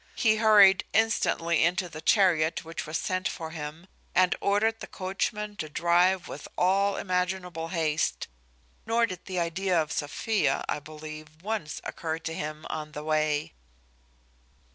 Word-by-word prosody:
He 220 -2 +3
hurried 205 -3 +7
instantly 170 -7 +2
into 180 +2 +1
the 155 -2 -9
chariot 170 -6 +3
which 165 -1 -6
was 155 0 -1
sent 185 0 -1
for 160 -1 -5
him, 155 +1 -7 0.3
and 185 0 +4
ordered 220 +3 +2
the - - -7
coachman 205 +2 -3
to 155 - -4
drive 175 +3 +2
with 145 - -8
all 195 +2 +3
imaginable 180 -2 -2
haste; 155 - -1 0.6
nor 230 +1 +3
did 185 -5 -8
the 185 -2 -3
idea 175 +1 +1
of 155 0 -1
Sophia, 150 - 0
I - - -1
believe, 155 +1 -10
once 205 -7 -3
occur 160 -1 -3
to 160 0 -5
him 155 0 -5
on 155 -1 -5
the 150 - -6
way. 155 -1 0
170 Hz, 145 wpm, -28 LUFS, 155-190 Hz, 0.6 s, hurried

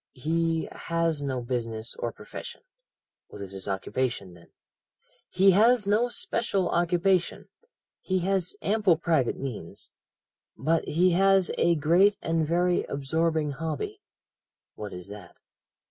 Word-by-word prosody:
"'He 165 +4 -1
has 165 -3 -1
no 135 -3 -2
business 115 -2 -3
or 120 - -3
profession. - - -9 0.7
"'What - - -12
is 100 -1 -7
his 95 0 -6
occupation, 100 0 -2
then? 85 -1 -17 0.8
"He 195 +1 +5
has 220 +3 +4
no 215 +5 +2
special 200 -4 -1
occupation. 175 +1 +1 0.5
He 185 - -1
has 190 0 0
ample 205 -5 +3
private 160 -7 +1
means. 120 -11 -7 0.7
But 165 +1 +1
he 180 +4 +3
has 195 +1 +3
a 170 - +3
great 175 +7 +4
and 165 -4 0
very 175 +2 +2
absorbing 155 +2 -1
hobby.' 165 - -4 0.7
"'What 105 -1 -7
is 90 0 -9
that?' 100 -4 -11
165 Hz, 125 wpm, -27 LUFS, 130-185 Hz, 0.8 s, He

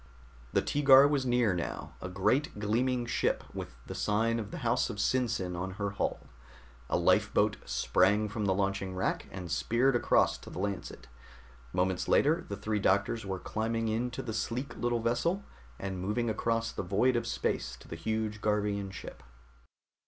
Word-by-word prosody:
The - - +2
Teegar 140 -1 +7
was 140 -3 0
near 120 -5 +3
now, 85 -2 -4
a 90 - -5
great 105 +9 +1
gleaming 120 +4 0
ship 120 - 0
with - - -6
the - - -6
sign 115 +2 +1
of 105 -3 -5
the 175 - -6
house 120 +2 +2
of 115 - -4
SinSin 110 -6 0
on 95 +2 -4
her 100 -1 -2
hull. 100 - -2 0.7
A - - +2
lifeboat - - +3
sprang 90 - +2
from 105 -1 -2
a - - +4
launching 95 -1 -1
rack 95 - -1
and 90 -3 -7
speared 120 +9 +2
across 120 - +3
to - - -11
the - - -9
Lancet. 95 -2 -4 0.7
Moments 90 0 0
later 160 +4 +3
the 100 - -4
three 105 +1 -1
doctors 100 +3 +1
were 95 -1 -2
climbing 115 +3 -2
into 115 +2 -2
the 110 - -4
sleek 120 +5 -3
little 120 -1 0
vessel 170 - 0 0.3
and 95 -2 -4
moving 110 +4 0
across 115 +1 0
the - - -4
void 100 +8 +2
of 120 - -1
space - - -2
to - - -15
the - - -6
huge 110 +4 -2
Garvian 105 -2 0
ship. 95 - -9
110 Hz, 170 wpm, -31 LUFS, 95-120 Hz, 0.7 s, Teegar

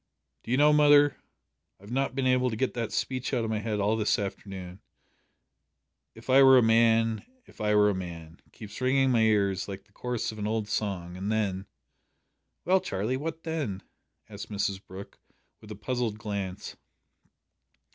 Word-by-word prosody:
"Do - - -13
you 125 - +2
know, 150 +1 +5
mother, 145 -1 +5 0.6
I've 100 +3 -13
not 135 +1 -1
been 135 -1 -1
able 130 0 +2
to 110 - -4
get 130 +4 -1
that 115 -3 -3
speech 130 +1 -2
out 120 - 0
of 110 - -2
my 110 - -1
head 105 -1 -3
all 105 +2 +1
this 110 -1 +1
afternoon. 95 -2 -6 1.3
`If 115 - -14
I 135 +1 +6
were 130 -1 +8
a 125 - +5
man 115 0 +3 0.2
if - - -14
I 105 0 +2
were 105 0 +5
a 105 - +2
man,' 85 -3 -8
keeps 105 +2 -10
ringing 130 +1 +3
in 130 - +2
my 115 -2 +3
ears 100 -3 +1
like 95 -1 -7
the 100 - -32
chorus 120 +2 -3
of 110 - -10
an 105 - -2
old 110 -1 -2
song, 95 -5 -3
and 95 +3 -3
then 100 -3 -1 0.5
" - - -51
"Well, 190 +2 +4
Charlie, 105 +6 -2
what 160 +4 -5
then?" 150 - -3 0.4
asked - - -9
Mrs 100 -1 -2
Brooke, 95 +2 -11 0.4
with 105 - -15
a 105 - -7
puzzled 115 0 -3
glance. 100 -4 -5
110 Hz, 185 wpm, -28 LUFS, 100-130 Hz, 1.3 s, were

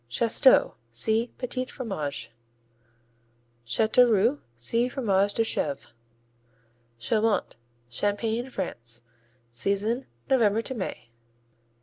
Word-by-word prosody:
Chasteaux 230 - +4 0.2
see 220 - 0
Petits 255 0 -3
Fromages. 175 - -4 1.3
Chateauroux 225 - +3
see 230 - 0
Fromage 205 -6 +1
de 225 - +3
Chèvre. 145 - -2 1.0
Chaumont 215 - 0 0.3
Champagne, 220 - -1
France 120 - -4 0.5
Season 200 - 0 0.2
November 225 -4 +3
to 260 - -3
May. 185 - -5
220 Hz, 80 wpm, -27 LUFS, 155-240 Hz, 1.3 s, Chasteaux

